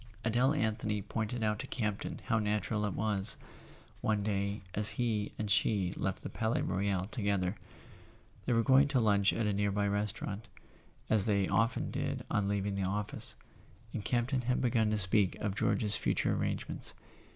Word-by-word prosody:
Adele 125 +6 +2
Anthony 110 -4 -1
pointed 110 +3 -3
out 105 -1 0
to 135 - -5
Campton 105 -6 -3
how 115 - +1
natural 105 0 -1
it 100 - -4
was, 105 -1 +2 0.6
one 105 -2 0
day 100 0 -2
as 105 +1 +9
he 110 -4 -1
and 105 -2 -3
she 100 -5 +1
left 95 0 -3
the - - -4
Palais 110 +1 -1
Royal 95 0 -1
together. 100 -4 -1 0.9
They - - +2
were 115 0 +3
going 135 +4 +5
to 140 -2 +1
lunch 100 -3 +3
at 115 - -1
a 105 - +1
near 100 0 0
by 100 +1 0
restau¬ 105 +1 -2
rant, 105 +2 -6 0.6
as 110 -2 +2
they 100 -3 +2
often 115 +1 0
did - - -3
on 105 -1 +1
leaving 100 0 -1
the 100 - -2
office, 100 +2 0 0.6
and 110 - -4
Camp¬ 120 +1 0
ton 130 -2 0
had 125 +1 0
begun 115 -3 +1
to 105 - 0
speak 95 0 +4
of 100 -2 -3
George's 105 +1 +1
future - - 0
arrange¬ - - -2
ments. - - -4
105 Hz, 180 wpm, -32 LUFS, 100-115 Hz, 0.9 s, as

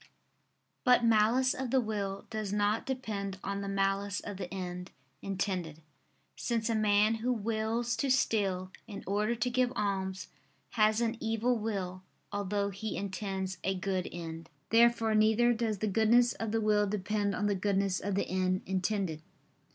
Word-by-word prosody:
But 250 -2 +5
malice 230 +4 +4
of 260 -1 -4
the 265 - +3
will 205 -4 -3
does 215 -3 -3
not 210 +1 +1
depend 210 -7 -3
on 200 0 -3
the 200 - -4
malice 195 0 0
of 205 -2 -7
the 185 -2 -6
end 180 -1 -5 0.3
intended; 185 -5 -3 0.6
since 230 -1 -1
a - - +1
man 210 0 +4
who 250 +2 +1
wills 225 +1 -1
to 275 - 0
steal 195 -7 +1 0.2
in 200 -2 -7
order 210 +4 0
to 245 +2 0
give 250 0 +2
alms, 190 -2 -2 0.4
has 215 -1 +3
an 230 0 0
evil 225 +2 +1
will, 190 -4 -3 0.3
although 200 0 -1
he 210 +3 -4
intends 190 -2 -3
a 190 +1 0
good 185 0 -2
end. 165 -1 -7 0.2
Therefore 230 -1 +4
neither 220 +3 +4
does 225 -2 -1
the 215 - -1
goodness 225 +4 +4
of 225 -1 -4
the 225 0 +1
will 210 -1 +3
depend 205 0 -1
on 205 - -1
the 205 - +2
goodness 195 -1 0
of 200 0 -2
the 200 - +1
end 185 0 0
intended. 190 -3 -1
205 Hz, 160 wpm, -31 LUFS, 195-225 Hz, 0.6 s, But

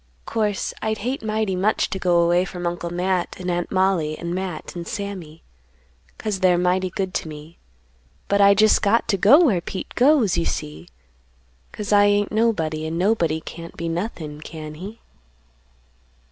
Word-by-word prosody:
'Course, 210 -3 -1
I'd 220 0 -1
hate 250 +6 -3
mighty 215 -3 -1
much 200 +4 +1
to 190 - -3
go 175 -2 +3
away 175 +1 +3
from 175 -1 -6
Uncle 175 0 -3
Matt 180 +1 -1
and 180 -1 -2
Aunt 175 0 -2
Mollie 185 -5 +1
and 170 0 -4
Matt 185 -3 -5
and 170 -1 -6
Sammy, 190 -7 -6 0.7
'cause 210 -3 -3
they're 185 -2 +4
mighty 180 +1 +1
good 190 +1 -3
to - - -2
me; 155 +2 -11 0.7
but 200 0 +2
I 200 0 +7
jest 215 +1 +4
got 225 +3 +2
to 200 - +2
go 275 - +6
where 195 - +2
Pete 185 - -6
goes, 245 - +3
you 165 - 0
see, 75 +3 -5 0.8
'cause 210 0 -3
I 205 0 +6
ain't 205 0 +2
nobody, 160 -9 0
and 160 +1 -3
nobody 170 -5 +1
can't 165 +1 -10
be 170 - -3
nothin', 165 -4 -4
can 155 -1 -8
he?" 195 +8 -9
185 Hz, 170 wpm, -22 LUFS, 170-205 Hz, 0.8 s, I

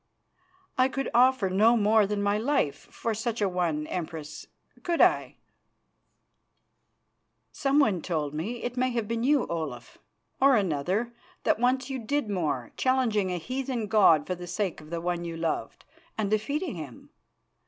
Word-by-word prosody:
"I 255 +1 +5
could 270 +1 -3
offer 255 -4 +4
no 215 +6 +4
more 215 -1 +4
than 205 0 -1
my 205 0 +2
life 235 - 0
for 230 - -3
such 225 +2 -3
a 205 - +2
one, 170 -5 -1
Empress, 155 -3 -6 0.3
could 340 -2 -1
I?" - - +3 2.2
"Someone 275 - +2
told 150 -5 -2
me 215 +11 -4
it 245 0 -3
may 255 +1 +2
have 230 -3 -1
been 230 +1 -2
you, 285 0 +3
Olaf, 150 -8 -5 0.4
or 275 -1 +6
another 195 +5 0 0.3
that - - +2
once 255 +2 +1
you 265 - -3
did 235 0 -1
more, 150 -10 -2
challenging 230 -7 +1
a 180 - -1
heathen 255 +4 -3
god 190 -8 +5
for 185 - -2
the 175 0 -8
sake 180 -1 -2
of 155 +1 -14
one 175 -1 -1
you 165 -1 -5
loved, 165 -1 -3 0.3
and 210 -2 -1
defeating 280 - -1
him. 150 -9 -9
210 Hz, 155 wpm, -27 LUFS, 170-250 Hz, 2.2 s, or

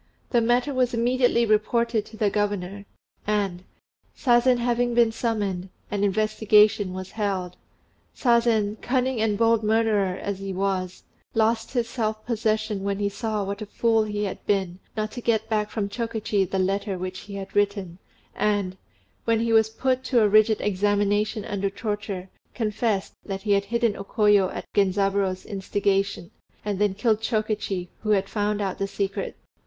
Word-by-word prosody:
The 240 - +4
matter 245 +4 +2
was 250 -2 +1
immediately 240 0 +2
reported 220 +1 +1
to 220 - -12
the 210 -2 +1
governor, 200 -1 -2 0.4
and, 200 -4 0 0.5
Sazen 245 0 +4
having 240 0 0
been 235 -1 +5
summoned, 205 -5 -2 0.2
an 205 -1 -1
investigation 210 -1 +3
was 185 0 -6
held. 190 -4 -2 0.6
Sazen, 230 -4 +2
cunning 255 -2 0
and 215 -2 +1
bold 230 0 +3
murderer 215 -4 +2
as 200 -1 -4
he 195 -1 -4
was, 185 -1 -2 0.3
lost 225 +1 +1
his 240 -3 0
self 220 -3 -3
possession 215 -3 0
when 200 0 -1
he 200 0 0
saw 215 0 -2
what 200 +2 -4
a 215 - -5
fool 225 +1 +2
he 210 -1 -3
had 195 - -4
been 190 -3 0 0.2
not 215 0 -1
to 245 - -7
get 220 -2 +1
back 210 -1 0
from 210 -3 -2
Chokichi 220 -2 -1
the 195 - -1
letter 195 +1 0
which 185 +1 -5
he 200 -1 -9
had 195 -1 -7
written, 200 -3 0 0.3
and, 200 -3 0 0.5
when 230 -1 +2
he 230 0 +1
was 220 -1 +5
put 255 +3 0
to 240 -4 +3
a - - +5
rigid 215 +1 +4
examination 205 +1 +1
under 200 -1 -1
torture, 205 -2 -4 0.3
confessed 215 -3 -1
that 195 -1 -5
he 210 - 0
had 200 0 +3
hidden 235 0 +1
O 195 - -6
Koyo 205 -2 +3
at - - -6
Genzaburô's 195 -1 +1
instigation, 195 -2 -1 0.3
and 205 -2 -2
then 205 -2 +2
killed 215 +1 +1
Chokichi, 215 -5 -1
who 215 - -5
had 195 -2 +3
found 205 0 -1
out 195 -2 -2
the 195 - 0
secret. 200 0 -3
210 Hz, 165 wpm, -25 LUFS, 195-225 Hz, 0.6 s, been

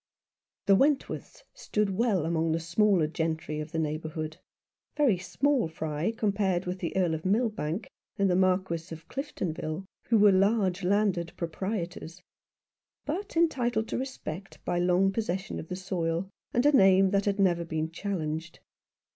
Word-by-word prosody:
The 195 - +6
Wentworths 275 +5 0
stood 210 -2 -1
well 195 -5 +1
among 165 -1 +1
the 165 - 0
smaller 170 +1 +3
gentry 160 -1 -2
of 155 +1 -6
the 165 - -3
neighbourhood; 155 0 -3 0.6
very 255 -12 +3
small 265 - +1
fry 160 +3 -2
com 220 -2 0
pared 190 -3 0
with 180 +1 -3
the 175 +1 -3
Earl 180 -4 +2
of 160 0 -3
Milbank 210 -3 0 0.3
and 200 - +3
the 180 - +2
Marquis 185 -3 +1
of 165 0 -9
Cliftonville, 185 - -4 0.2
who 230 - +4
were 205 -1 +7
large 195 -1 +2
landed 185 -3 +1
proprietors; 175 0 -4 0.9
but 340 +4 -4
entitled 245 -9 +2
to - - -1
respect 195 - -6
by 175 - 0
long 180 +2 +3
possession 195 -3 -2
of 160 - -8
the 180 - -4
soil, 180 -1 -2 0.2
and 245 +3 +1
a 295 - +7
name 190 -2 +6
that 200 0 +2
had 200 -1 +1
never 175 -3 +3
been 160 -1 -3
challenged. 165 -4 -4
185 Hz, 155 wpm, -28 LUFS, 165-210 Hz, 0.9 s, were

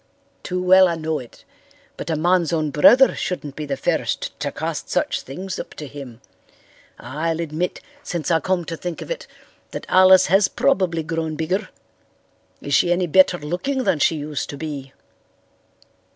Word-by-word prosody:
"Too 180 0 -3
well 185 +1 +6
I 170 - -1
know 160 -1 -2
it, 120 - -13 0.5
but 155 - -7
a 160 - +1
man's 175 +1 +2
own 155 -3 0
brother 240 - +6
shouldn't 150 -6 -4
be 150 -1 -5
the 140 -1 -2
first - - -1
to - - -2
cast - - -4
such - - 0
things 185 +8 -6
up - - -8
to 150 - -7
him. 135 -4 -10 0.8
I'll 155 +6 -3
admit, 165 +2 -3 0.2
since 170 - -3
I 165 - +4
come 180 +2 -1
to 165 - -4
think 175 0 -5
of - - -9
it, - - -5 0.4
that - - -7
Alice 185 0 +6
has 195 +1 +4
probably 185 -12 +1
grown 160 0 -3
bigger. 175 +6 -2 0.9
Is - - -3
she 175 - +4
any 180 +1 +2
better 185 +1 +4
looking 180 - -2
than 160 - +1
she 160 - +3
used 150 -1 -4
to 140 - -6
be?" 140 -3 -6
165 Hz, 170 wpm, -21 LUFS, 150-185 Hz, 0.9 s, well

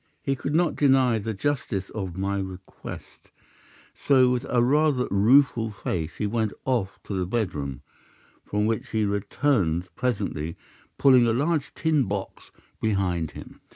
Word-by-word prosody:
He 135 - 0
could 140 +3 -3
not 170 0 +2
deny 130 -5 +3
the 110 +1 -4
justice 120 -5 -2
of 95 -5 -5
my 100 +1 -1
request, 95 -1 -9 0.6
so 130 -3 +4
with 125 +1 -1
a 120 -1 +3
rather 140 -1 +3
rueful 115 +3 +4
face 85 -5 -4
he 105 - -2
went 110 0 -1
off 115 -7 -1
to - - -6
his 90 -2 -1
bedroom, 75 - -3 0.6
from 105 +1 -1
which 110 0 -1
he 110 -2 0
returned 100 - 0
presently 85 - -2 0.4
pulling 130 -3 +6
a 115 - +2
large 145 +4 0
tin 155 -4 +2
box 100 -1 -5 0.3
behind 90 -7 0
him. - - -12
110 Hz, 145 wpm, -25 LUFS, 95-130 Hz, 0.6 s, pulling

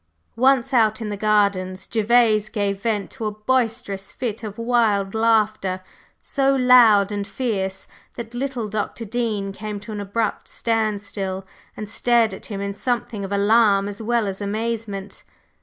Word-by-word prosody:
Once 265 +1 +3
out 220 -3 +3
in 220 -2 -4
the 205 - -3
grounds, 200 -3 +1
Gervase 220 -1 +3
gave 200 -2 -2
vent 210 -3 -1
to 225 -5 -4
a - - -1
boisterous 215 -3 -1
fit 230 -3 -4
of 210 0 -6
wild 225 -5 +1
laughter, 215 -4 +1 0.4
so 275 -1 +1
loud 240 -6 +6
and 205 -1 -3
fierce 195 -4 -3 0.3
that 235 -1 -7
little 250 -3 -3
Dr. 215 +2 -3
Dean 215 -3 -2
came 205 +1 -6
to 215 +2 -9
an 210 -1 -4
abrupt 205 +2 -2
standstill, 205 -4 -2 0.3
and 215 - -5
stared 230 0 +2
at - - -8
him 200 -2 -5
in 200 0 -3
something 235 -2 -2
of 195 - -6
alarm 200 0 +4
as 205 +1 -6
well 235 0 +1
as 195 0 -4
amazement. 210 -1 -4
215 Hz, 155 wpm, -22 LUFS, 200-230 Hz, 0.4 s, loud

